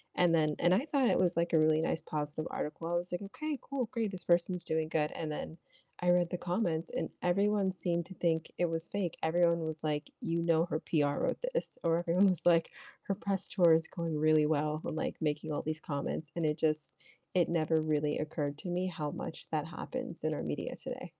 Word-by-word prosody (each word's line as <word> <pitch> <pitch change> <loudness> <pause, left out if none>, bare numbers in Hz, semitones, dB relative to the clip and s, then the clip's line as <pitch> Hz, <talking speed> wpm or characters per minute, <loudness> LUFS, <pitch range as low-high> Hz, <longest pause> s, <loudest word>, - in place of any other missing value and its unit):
and 175 -2 +4
then 155 -2 +3
and 175 +1 +4
I 240 +10 +2
thought 270 -4 +3
it - - +3
was, 175 -2 +2
like, 170 0 +1
a 160 - +6
really 155 0 +4
nice 160 - 0
positive 150 +1 -3
article. 155 +2 -4
I 175 - 0
was, 175 +1 -1
like, 175 - -2
"Okay, 290 +8 -4
cool, 265 -4 -2
great, 230 -4 -1
this 185 -2 -4
person's 175 +1 +2
doing 160 0 -1
good." 150 -2 +1
And 155 -1 -4
then 160 +2 -5 0.4
I 180 0 +1
read 175 -1 +4
the 180 - -1
comments 175 -3 -1
and - - -2
everyone 200 +2 +2
seemed 170 -2 -1
to 190 - -10
think 160 -2 0
it 175 - +2
was 165 0 -2
fake. 190 -5 -2
Everyone 170 +1 +3
was, 160 0 -4
like, 150 -1 -1
"You 170 0 -1
know 165 0 +3
her 155 -3 -2
PR 145 -3 +1
wrote - - 0
this." - - -2
Or, 165 0 +3
everyone 175 +3 +4
was, 180 - -1
like, 165 -1 +4 0.3
"Her 195 - -1
press 195 -1 -1
tour 175 -4 +5
is 160 0 +3
going 165 -3 -3
really 155 0 +4
well," 150 0 0
and, - - -3
like, - - -2
making 150 0 -1
all - - -1
these 155 0 -3
comments, 150 +1 -4
and 170 - -1
it 150 +1 +1
just 155 -2 0 0.4
it 175 - +3
never 160 -1 +2
really 150 -1 0
occurred 150 -2 -2
to 180 - -5
me 180 +1 0
how 155 -4 -3
much - - -6
that - - -1
happens - - -6
in - - +1
our - - -4
media - - -3
today. - - -7
165 Hz, 225 wpm, -32 LUFS, 155-180 Hz, 0.4 s, a